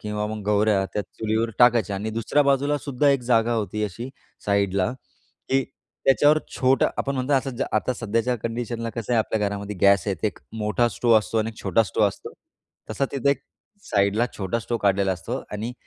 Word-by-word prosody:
किंवा 105 0 -3
मग 105 0 -5
गवऱ्या, 105 -1 +3
त्या 105 - 0
चुलीवर 110 +2 -2
टाकायच्या 115 -5 +4
आणि 105 +3 -3
दुसऱ्या 115 +6 +1
बाजूलासुद्धा 140 0 +1
एक 140 -2 +2
जागा 120 -1 +2
होती 105 -1 -2
अशी, 105 +5 -6 0.4
साईडला, 100 0 +1 0.6
की 135 0 +2 0.4
त्याच्यावर 145 +3 +5 0.2
छोटं 130 +1 +3
आपण 140 - -1
म्हणतो, 130 +2 -1
असं 135 0 +1
जा - - 0
आता 120 +4 0
सध्याच्या 115 +2 -1
कंडिशनला 115 0 -3
कसं 115 +1 -4
आहे, 120 - +4
आपल्या 110 0 0
घरामध्ये 100 0 -5
गॅस 100 -1 +4
आहे, 100 - 0
ते - - +3
एक 105 - -4 0.2
मोठा 105 +3 +1
स्टोव 115 +2 +2
असतो 110 +1 -2
आणि 110 0 0
एक 110 - -18
छोटा 115 - +3
स्टोव्ह 105 +1 +1
असतो. 95 - -10 0.6
तसा 140 - 0
तिथे, 140 0 +2
एक 140 - 0 0.5
साइडला 100 +3 +2
छोटा 95 +3 -2
स्टोव्ह 115 0 -3
काढलेला 100 -1 +2
असतो 90 - -5
आणि 110 +4 -4
110 Hz, 185 wpm, -24 LUFS, 105-125 Hz, 0.6 s, त्याच्यावर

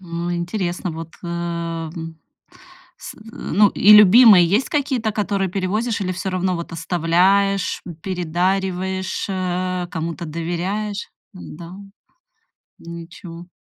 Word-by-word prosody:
О 170 -1 -4
интересно, 175 0 -3
вот 165 0 -7
эм. 165 -1 -5 0.8
С, - - -9
э, - - -20
ну, 205 0 +2
и 210 +2 +5
любимые 210 -3 +8
есть 210 +9 +1
какие-то, 265 -6 0
которые 200 -2 -1
перевозишь 205 +5 -1
или 185 -1 -1
всё 190 +2 -4
равно 185 0 -1
вот 170 - -7
оставляешь, 180 +4 +1
м, 175 - -7
передариваешь, 185 +2 -2
э, 185 -1 -2
кому-то 165 +1 -4
доверяешь? 180 +6 -3 0.2
Н-да. 170 -1 -10 1.1
Ничего. 170 +1 -10
180 Hz, 110 wpm, -20 LUFS, 170-195 Hz, 1.1 s, любимые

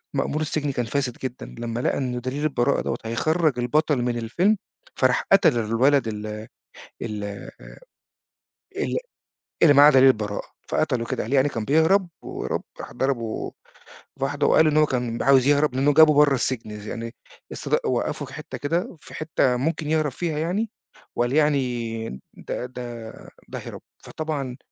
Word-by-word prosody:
مأمور 145 +3 -1
السجن 150 -1 -1
كان 125 -2 -2
فاسد 130 +1 -2
جدًا، 130 -1 -5
لما 120 0 -3
لقى - - 0
إن 125 -2 -2
دليل 130 +4 -3
البراءة 135 -5 +1
دوّة - - -2
هيخرّج 155 +4 +1
البطل 145 +2 +1
من 120 0 -1
الفيلم، 170 - +1 0.4
فراح 130 -1 +2
قتل 195 -10 +5
الولد 120 +4 +2
ال 105 -1 -4 0.8
ال 105 -3 -4 1.5
ال - - -1 0.7
اللي 155 -3 +8
معاه 145 +1 +8
دليل 135 -1 +7
البراءة، 105 -5 0 0.2
فقتله 125 -7 0
كده - - -2
قال 115 +6 -4
يعني 140 +1 +4
كان 115 -5 -4
بيهرب 160 - +3
وهوب - - -4 0.2
راح - - -8
ضربه 120 -5 -2 0.7
واحدة 140 +1 0
وقال 160 - +5
إنه 155 0 +4
كان 120 -4 -2
عاوز 135 -1 +5
يهرب 145 -2 +3
لإنه 140 +3 +3
جابه 155 +1 +7
برّا 145 -1 +5
السجن، 120 -3 -2 0.2
يعني 115 0 -6 0.4
اصط - - -1
وقّفه - - -1
في - - -13
حتّة - - -7
كده، 165 +4 -2
في - - -14
حتّة 150 -5 +1
ممكن 155 +3 -2
يهرب 155 -2 +1
فيها 160 +3 -3
يعني، 190 +8 -1 0.5
وقال 120 +1 0
يعني 125 -7 0 0.2
ده - - -5
ده 120 -3 -7 0.4
ده - - -6
هرب. - - -9 0.2
فطبعًا، 145 -5 -4
135 Hz, 155 wpm, -24 LUFS, 120-150 Hz, 1.5 s, اللي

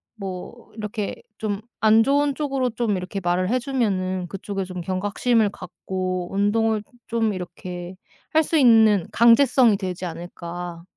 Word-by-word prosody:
뭐 195 +3 -8
이렇게 210 -1 -4 0.2
좀 205 -2 -2 0.2
'안 220 +1 +5
좋은 285 +2 +2
쪽으로 270 -4 -1
좀 220 -4 -1
이렇게 185 +2 -4
말을 180 +2 0
해 250 - +2
주면은 195 -9 -1
그쪽에 195 +1 -4
좀 180 -1 -6
경각심을 205 +5 +1
갖고 185 -1 -4
운동을 215 +2 +1 0.2
좀 225 -2 0
이렇게 180 0 -7 0.4
할 315 - +5
수 320 +1 0
있는 220 - +5
강제성이 235 0 +5
되지 185 -1 -4
않을까.' 175 0 -7
205 Hz, 280 characters per minute, -23 LUFS, 185-230 Hz, 0.4 s, 안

